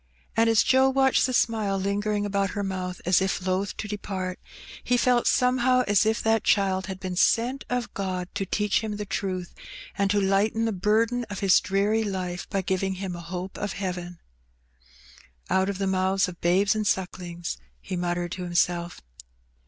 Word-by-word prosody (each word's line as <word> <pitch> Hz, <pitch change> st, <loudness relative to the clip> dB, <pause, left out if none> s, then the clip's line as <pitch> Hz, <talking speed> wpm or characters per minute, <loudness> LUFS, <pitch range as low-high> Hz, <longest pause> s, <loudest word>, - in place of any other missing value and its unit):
And 225 Hz, +1 st, +4 dB
as 225 Hz, -1 st, +5 dB
Joe 265 Hz, 0 st, +4 dB
watched 265 Hz, -1 st, +3 dB
the -, -, -2 dB
smile 220 Hz, -5 st, +1 dB
lingering 205 Hz, +2 st, -1 dB
about 200 Hz, -1 st, 0 dB
her 205 Hz, -, -1 dB
mouth 185 Hz, -2 st, -4 dB
as 180 Hz, +2 st, +4 dB
if 190 Hz, -1 st, -1 dB
loth 190 Hz, +2 st, -1 dB
to 215 Hz, -, -4 dB
depart, 190 Hz, -3 st, -4 dB, 0.4 s
he 245 Hz, -, +2 dB
felt 245 Hz, -1 st, +3 dB
somehow 255 Hz, 0 st, +3 dB
as 205 Hz, +1 st, +3 dB
if 220 Hz, +1 st, 0 dB
that 225 Hz, -1 st, +2 dB
child 190 Hz, -2 st, +2 dB
had 190 Hz, -1 st, -6 dB
been 185 Hz, -1 st, -4 dB
sent 245 Hz, +8 st, +2 dB
of 245 Hz, -1 st, -2 dB
God 185 Hz, -2 st, -3 dB
to 205 Hz, -, -2 dB
teach 205 Hz, +1 st, +1 dB
him 215 Hz, -1 st, -3 dB
the 210 Hz, -, -4 dB
truth, 185 Hz, -3 st, -3 dB, 0.4 s
and 200 Hz, 0 st, +1 dB
to 205 Hz, +1 st, +2 dB
lighten 200 Hz, +3 st, +1 dB
the 225 Hz, -, 0 dB
burden 220 Hz, +5 st, +1 dB
of 205 Hz, -3 st, -7 dB
his 195 Hz, -3 st, +5 dB
dreary 205 Hz, +3 st, +1 dB
life 185 Hz, -3 st, -4 dB
by 195 Hz, -1 st, -1 dB
giving 190 Hz, +1 st, -1 dB
him 185 Hz, -1 st, -5 dB
a 170 Hz, -, -7 dB
hope 180 Hz, +2 st, -6 dB
of 205 Hz, -1 st, -3 dB
heaven. 180 Hz, -3 st, -5 dB, 0.5 s
" -, -, -28 dB
' 65 Hz, -1 st, -22 dB
Out 190 Hz, +1 st, +2 dB
of 200 Hz, -, -3 dB
the 195 Hz, -, -1 dB
mouths 190 Hz, 0 st, +1 dB
of 175 Hz, -1 st, -9 dB
babes 190 Hz, +5 st, +3 dB
and 215 Hz, -1 st, -1 dB
sucklings,' 175 Hz, -2 st, -3 dB
" -, -, -38 dB
he 185 Hz, -, -5 dB
mut 175 Hz, 0 st, -1 dB
tered 175 Hz, -1 st, -3 dB
to 185 Hz, -, -5 dB
himself. 175 Hz, 0 st, 0 dB
195 Hz, 195 wpm, -26 LUFS, 180-215 Hz, 0.5 s, as